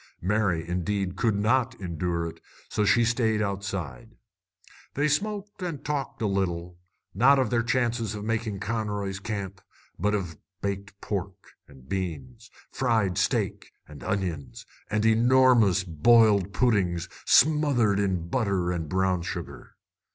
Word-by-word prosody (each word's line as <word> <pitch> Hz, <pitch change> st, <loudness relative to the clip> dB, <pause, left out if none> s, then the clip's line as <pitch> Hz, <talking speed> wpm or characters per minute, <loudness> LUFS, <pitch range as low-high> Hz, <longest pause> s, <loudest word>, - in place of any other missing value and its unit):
Mary, 95 Hz, -4 st, 0 dB
indeed, 90 Hz, +2 st, -2 dB
could 110 Hz, +1 st, +1 dB
not 115 Hz, +5 st, +1 dB
endure 85 Hz, -2 st, -2 dB
it, 80 Hz, -, -9 dB, 0.3 s
so 105 Hz, -, 0 dB
she 110 Hz, +3 st, +4 dB
stayed 115 Hz, -2 st, +1 dB
outside. 95 Hz, -, -4 dB, 0.8 s
They 145 Hz, +2 st, +2 dB
smoked 205 Hz, +6 st, -2 dB
and 175 Hz, -4 st, -3 dB
they -, -, -22 dB
talked 140 Hz, -5 st, -3 dB
a -, -, +2 dB
little, 90 Hz, -3 st, -2 dB, 0.3 s
not 135 Hz, +8 st, +5 dB
of 130 Hz, -5 st, +1 dB
their 120 Hz, -1 st, +2 dB
chances 115 Hz, -2 st, 0 dB
of 105 Hz, -, -6 dB
making 110 Hz, -2 st, -2 dB
Conroy's 105 Hz, -2 st, -3 dB
Camp, 100 Hz, -4 st, -5 dB, 0.4 s
but 105 Hz, 0 st, +1 dB
of 90 Hz, -6 st, -4 dB, 0.2 s
baked 100 Hz, 0 st, -5 dB
pork 95 Hz, -1 st, -5 dB, 0.2 s
and 65 Hz, -2 st, -17 dB
beans, 80 Hz, -9 st, -5 dB, 0.2 s
fried 100 Hz, -5 st, +1 dB
steak 85 Hz, -, -1 dB
and 75 Hz, -2 st, -12 dB
onions, 90 Hz, -8 st, -3 dB, 0.2 s
and 105 Hz, +1 st, 0 dB
enormous 115 Hz, -4 st, +4 dB
boiled 100 Hz, +3 st, +4 dB
puddings 95 Hz, -5 st, +1 dB, 0.2 s
smothered 135 Hz, -8 st, +4 dB
in 95 Hz, -4 st, -1 dB
butter 95 Hz, -5 st, 0 dB
and 80 Hz, -4 st, -3 dB
brown 95 Hz, 0 st, +1 dB
sugar. 85 Hz, -2 st, -7 dB
100 Hz, 135 wpm, -26 LUFS, 90-115 Hz, 0.8 s, not